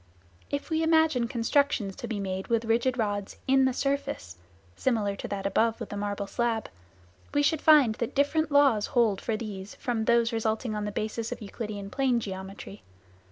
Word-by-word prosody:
If 285 +4 -4
we 320 0 +1
imagine 320 -6 +3
constructions 235 -4 +1
to - - -6
be 220 -3 -3
made 190 -1 -3
with 230 -1 +1
rigid 235 +3 +1
rods 205 -3 -2
in 265 0 +5
the 260 - +3
surface 275 - -2 0.4
(similar 215 - 0
to - - -5
that 195 -1 -4
above 225 +3 +1
with - - -6
the - - -5
marble 205 0 -3
slab), 230 +1 -1 0.7
we 290 - +4
should 310 +1 +2
find 295 -8 +6
that 235 +1 -4
different 305 +3 +1
laws 275 -7 +4
hold 230 -7 +2
for 225 -2 -1
these 200 -3 -7
from 235 -4 -2
those 235 0 +3
resulting 220 +1 -1
on 210 -1 -2
the 210 - -3
basis 220 +2 -3
of - - -4
Euclidean 205 -1 -6
plane 260 -3 +2
geometry. 195 0 -7
230 Hz, 180 wpm, -28 LUFS, 205-265 Hz, 0.7 s, find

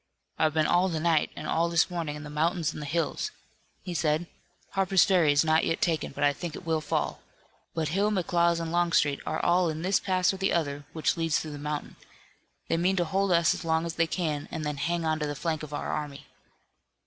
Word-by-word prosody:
"I've 155 -1 +2
been 155 -1 +3
all 180 +4 +3
the 165 -3 -2
night 160 -1 +2
and - - -7
all 170 +1 +1
this 170 +2 +2
morning 165 -4 -3
in 150 - -8
the 150 - -8
mountains 160 +1 0
and 150 - -6
hills," 155 +2 -1 0.5
he 180 - -5
said. 155 0 +1 0.5
"Harper's 195 -2 +3
Ferry 180 -7 +4
is 145 +2 +3
not 160 0 +3
yet 165 - 0
taken, 165 -2 0
but - - -4
I 145 0 +4
think 170 +1 -6
it - - -9
will 160 -1 0
fall. 150 - -2 0.5
But 160 -2 -1
Hill, 200 +6 +1
McLaws 170 -3 +2
and 165 -1 -3
Longstreet 170 -5 +2
are - - -1
all 175 0 +3
in 160 +1 -4
this 190 +2 +2
pass 185 -1 +1
or - - -5
the 195 +1 0
other 145 -3 -1
which 160 +1 0
leads 165 -2 +1
through 155 - -6
the 145 - -7
mountain. 150 0 -4 0.7
They 165 - +1
mean 180 +3 +2
to 175 -2 +1
hold 195 +3 0
us 170 -2 +4
as - - -6
long 160 0 +1
as 165 - -3
they 165 0 +1
can, 155 -5 -2
and 160 -2 -4
then 150 -1 -2
hang 170 +4 -1
on 155 0 0
to 150 - -1
the 145 - -3
flank 160 +1 -2
of 155 -1 -8
our 145 - -3
army." 145 -2 -5
165 Hz, 230 wpm, -28 LUFS, 150-175 Hz, 0.7 s, Ferry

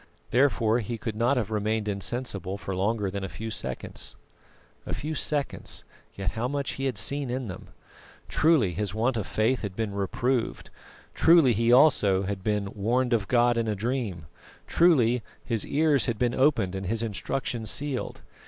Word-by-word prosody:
Therefore 120 -3 +3
he 115 +1 -4
could 110 0 -4
not 120 +5 +2
have 110 -3 -1
remained 110 0 -1
insensible 100 -2 -3
for 100 -2 -5
longer 100 +1 0
than 100 0 -4
a 95 - -4
few 110 +4 -6
seconds. - - -5 0.7
A - - -4
few 155 +2 -4
seconds, 145 -1 -2 0.3
yet 95 -1 -2
how 115 +6 -2
much 140 0 -2
he 135 - -4
had 130 - -1
seen 140 -2 0
in 125 0 -3
them. 90 - -8 0.6
Truly 150 - +3
his 105 +1 -3
want 120 +3 +1
of 110 -3 -2
faith 115 +4 +1
had 100 -3 -5
been 110 -2 -2
reproved 115 +5 -1 0.4
truly 160 -7 +6
he 115 +2 +2
also 115 -8 +5
had 95 -1 -4
been 105 -1 -1
"warned 120 +5 +1
of 105 -4 +1
God 120 -1 +3
in 115 - -1
a 105 - 0
dream," 110 -6 -3 0.4
truly 125 -9 +4 0.2
"his 115 -4 -1
ears 145 -2 +2
had 120 -3 -1
been 120 +1 +1
opened 130 -9 +2
and 95 -1 -4
his 115 +3 -1
instruction 115 +1 -2
sealed." 140 +3 -2
115 Hz, 170 wpm, -27 LUFS, 100-130 Hz, 0.7 s, truly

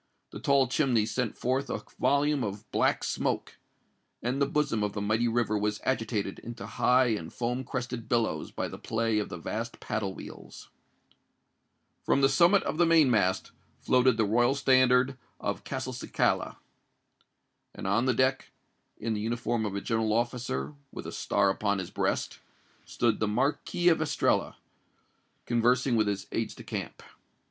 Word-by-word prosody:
The - - -7
tall 140 -2 +3
chimney 125 -5 +2
sent 125 0 -2
forth 130 +3 -1
a - - -3 0.2
volume 145 -1 +2
of 105 +1 -5
black - - +2
smoke; - - -2 0.7
and 125 +4 -1
the 140 - +3
bosom 140 -7 0
of 105 -1 -1
the 105 - -3
mighty 110 +3 +1
river 115 -2 +1
was 105 0 -1
agitated 110 -6 -1
into 120 0 -8
high 125 0 +3
and 100 -8 -3
foam 125 +2 -2
crested 125 -2 -5
billows 115 -2 0
by - - -3
the - - -9
play 115 -1 0
of 105 - -3
the - - -6
vast 115 +7 -5
paddle 105 -3 -3
wheels. - - -11 1.3
From 140 - +2
the 135 - +5
summit 170 +8 +5
of 155 - -3
the 175 - +6
main 160 -5 +5
mast 95 -4 +1 0.3
floated 125 -2 +3
the 110 - +3
royal 120 +5 +3
standard 130 -1 +3 0.2
of - - -3
Castelcicala. - - -1 1.2
And - - -7
on 100 +6 +2
the 130 - +2
deck, 130 +1 +1 0.5
in 115 +1 -2
the 105 - -2
uniform 115 0 -1
of 100 - -5
a 100 - -2
general 110 -1 0
officer, 120 - -1
and 75 - -17 0.2
with - - -8
a - - -5
star 100 -1 +1
upon 100 0 0
his 95 -2 -5
breast, - - -1 0.5
stood 115 -3 0
the 110 - +1
Marquis 140 +9 0
of 165 -2 +2
Estella, 160 - +1 0.9
conversing 120 +2 +2
with 110 -2 +2
his 100 -1 -2
aides - - -2
de - - -11
camp. - - -6
120 Hz, 165 wpm, -29 LUFS, 105-130 Hz, 1.3 s, the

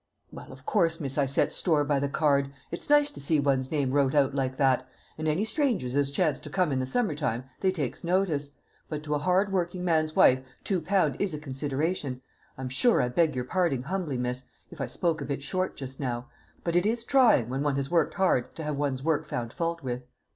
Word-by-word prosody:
"Well, - - -10
of 130 0 -13
course, 165 -6 +1
miss, 135 -3 -4
I 140 - +3
set 135 - +1
store 155 -5 +2
by 145 -1 +1
the 140 0 -1
card. 140 -2 +2 0.2
It's 170 - -6
nice 295 0 +5
to - - -10
see 150 +2 +1
one's 135 -2 +1
name 140 -4 0
wrote 140 0 +2
out 140 -2 +3
like 130 -1 -1
that, 130 -2 +2 0.3
and 155 0 -3
any 160 +8 +1
strangers 225 - 0
as 140 -1 +2
chance 150 -1 0
to 150 - -9
come 180 0 +1
in 135 - 0
the 130 - -2
summer 220 - 0
time, 130 -5 -2 0.2
they 190 - +2
takes 150 -9 -4
notice; 170 -6 0 0.3
but 150 -1 -4
to 150 -1 -2
a 150 - +1
hard 185 +5 +2
working 180 -1 -1
man's 155 -2 +1
wife 130 - +6 0.2
two 190 -4 0
pound 160 -5 +1
is 195 -6 0
a - - -5
consideration. 140 0 -2 0.4
I'm 130 0 -4
sure 230 - +4
I 125 - +1
beg 155 +2 +2
your 125 -1 -2
parding 155 -4 0
humbly, 165 -3 -2
miss, 125 +1 -3 0.3
if 165 -5 -8
I 135 - -1
spoke 165 -3 -1
a - - -3
bit 140 0 -4
short 185 +6 -2
just 135 -1 -6
now; 125 -2 -3 0.4
but 170 -1 -1
it 175 +3 +3
is 230 +1 -1
trying, 240 - +4
when 135 +2 -2
one 145 -1 +1
has 140 +2 -2
worked 170 -1 +2
hard, 185 -10 +1
to 160 - -6
have 150 -2 -2
one's 140 -2 -1
work 155 -1 0
found 120 -5 -4
fault 170 -2 -2
with." 125 -1 -3
150 Hz, 230 wpm, -28 LUFS, 135-175 Hz, 0.4 s, wife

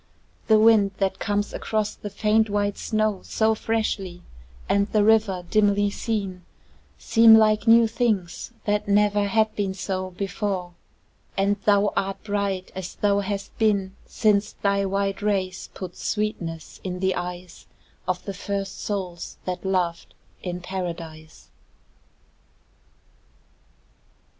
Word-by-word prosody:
The 220 - +6
wind 215 -3 +5
that 190 -1 -1
comes 205 0 -1
across 215 -1 -1
the 205 - -7
faint 215 +2 +2
white 205 0 -1
snow 215 -3 0
So 220 0 +1
freshly, 210 -5 -2 0.4
and 200 0 +2
the 210 -1 +2
river 210 -4 +3
dimly 205 -1 +3
seen, 200 -5 -3 0.5
Seem 225 0 +7
like 215 0 +4
new 230 0 +7
things 220 -5 -1
that 210 -1 0
never 205 0 +3
had 220 +2 +1
been 195 -2 -1
so 185 -1 -3
Before; 190 -1 -3 0.6
and 200 +1 +2
thou 205 0 +4
art 195 0 -2
bright 200 -3 -2
as 185 -1 -6
thou 200 -1 +2
hast 200 0 -4
been 200 -3 +1
Since 210 -2 +1
thy 200 -1 0
white 195 +1 -1
rays 190 -3 -1
put 185 -2 -7
sweetness 180 -7 -4
in 180 -1 -4
the 190 0 +1
eyes 175 0 -7 0.4
Of 180 -1 -2
the 200 - -4
first 195 0 -4
souls 185 -4 -4
that 180 -1 -4
loved 180 -3 -1 0.3
in 180 -1 -4
Paradise. 170 -4 -7
200 Hz, 125 wpm, -24 LUFS, 185-210 Hz, 0.6 s, Seem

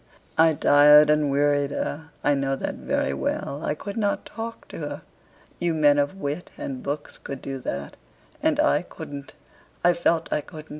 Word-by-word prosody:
I 160 -1 +5
tired 150 +1 +7
and 150 -1 +2
wearied 145 0 +2
her, 145 +2 -4
I 145 - +4
know 135 -1 0
that - - -3
very 70 - -1
well. 140 - -3
I 150 - -1
could 200 +7 -7
not 205 -2 0
talk 230 0 -7
to - - -8
her. - - -5 0.6
You 170 -2 0
men 145 -2 +4
of 145 +5 0
wit 155 -2 -4
and 130 -2 -5
books 145 +1 -5
could 140 -1 -6
do 135 0 -5
that, 70 - -5 0.4
and - - +1
I - - +3
couldn't 140 0 -9 0.5
I 175 - +5
felt 170 -1 0
I 150 - +1
couldn't. 155 +1 -11
145 Hz, 180 wpm, -25 LUFS, 140-160 Hz, 0.6 s, tired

